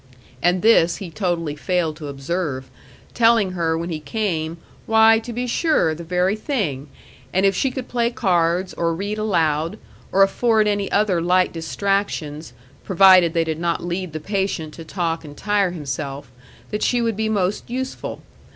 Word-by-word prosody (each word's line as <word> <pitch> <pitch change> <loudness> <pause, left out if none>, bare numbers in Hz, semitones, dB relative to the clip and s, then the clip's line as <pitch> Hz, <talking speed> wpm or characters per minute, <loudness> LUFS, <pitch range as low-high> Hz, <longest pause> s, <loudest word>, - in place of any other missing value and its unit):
And 180 +3 +2
this 195 -7 +5
he 190 -5 -7
totally 170 -5 -2
failed 165 0 -1
to 150 -2 -7
observe, 140 -1 -4 0.4
telling 225 -4 +4
her 165 -3 0
when 170 +1 -4
he 155 - -3
came, 165 -1 -2 0.3
why, 225 0 +6
to 230 +2 -8
be 245 +2 -3
sure! 250 - +2
the 165 +2 -8
very 180 +3 +1
thing! 195 - -2 0.4
And 190 +2 +2
if 195 - +4
she 270 - +1
could 255 -1 -6
play 235 -1 0
cards 180 -5 +1
or 165 -1 -1
read 205 +4 -3
aloud, 165 -6 0 0.3
or 195 - +5
afford 220 +2 +2
any 205 -1 -1
other 200 -4 +2
light 180 +2 +2
distractions, 165 -5 -2 0.3
provided 185 -2 +6
they 165 - +3
did 160 -1 -3
not 170 0 -1
lead 175 -1 -3
the 155 - -4
patient 190 -3 -2
to 165 - -9
talk 165 -1 -2
and 145 -1 -11
tire 205 -2 +1
himself, 140 -4 -5 0.4
that 210 - -2
she 245 - +2
would 230 -2 0
be 220 +1 -1
most 200 -1 -1
useful. 260 +2 -5
180 Hz, 170 wpm, -21 LUFS, 160-210 Hz, 0.4 s, why